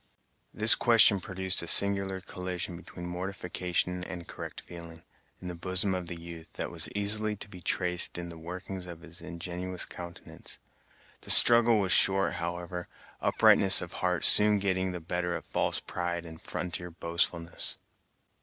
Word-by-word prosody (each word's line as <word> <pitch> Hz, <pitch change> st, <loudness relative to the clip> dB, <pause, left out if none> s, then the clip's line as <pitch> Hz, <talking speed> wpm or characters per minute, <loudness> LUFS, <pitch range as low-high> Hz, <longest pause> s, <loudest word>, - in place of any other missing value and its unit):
This 110 Hz, +2 st, +4 dB
question 115 Hz, -4 st, +4 dB
produced 95 Hz, +1 st, -3 dB
a 85 Hz, -, -8 dB
singular 100 Hz, -1 st, +2 dB
collision 90 Hz, -1 st, -6 dB
between 85 Hz, +1 st, -11 dB
mortification 90 Hz, -1 st, -3 dB
and 90 Hz, -2 st, -8 dB
correct -, -, -8 dB
feeling, 85 Hz, -1 st, -12 dB, 0.4 s
in 90 Hz, -, -9 dB
the 90 Hz, -, -5 dB
bosom 95 Hz, +3 st, -1 dB
of 90 Hz, -2 st, -5 dB
the 85 Hz, -1 st, -5 dB
youth, 85 Hz, -1 st, -12 dB
that -, -, -6 dB
was -, -, -4 dB
easily 105 Hz, +1 st, +3 dB
to 105 Hz, -, -10 dB
be 90 Hz, -3 st, -13 dB
traced 90 Hz, 0 st, -1 dB
in 85 Hz, 0 st, -6 dB
the 85 Hz, -, -11 dB
workings 90 Hz, +2 st, -7 dB
of 85 Hz, -1 st, -10 dB
his 85 Hz, 0 st, -11 dB
ingenuous 90 Hz, +1 st, -6 dB
countenance. 85 Hz, -1 st, -10 dB, 0.6 s
The -, -, -12 dB
struggle 120 Hz, -1 st, +8 dB
was 95 Hz, -3 st, -1 dB
short, 95 Hz, 0 st, +4 dB
however; 85 Hz, +1 st, -6 dB, 0.3 s
uprightness 95 Hz, -1 st, +5 dB
of 85 Hz, -, -6 dB
heart 90 Hz, -1 st, -1 dB
soon 105 Hz, 0 st, +7 dB
getting 95 Hz, -1 st, -2 dB
the 90 Hz, -, -6 dB
better 90 Hz, +1 st, -3 dB
of -, -, -8 dB
false -, -, -2 dB
pride 85 Hz, -1 st, -5 dB
and 80 Hz, -1 st, -12 dB
frontier 90 Hz, 0 st, -4 dB
boastfulness. 85 Hz, 0 st, -1 dB
90 Hz, 155 wpm, -28 LUFS, 85-95 Hz, 0.6 s, struggle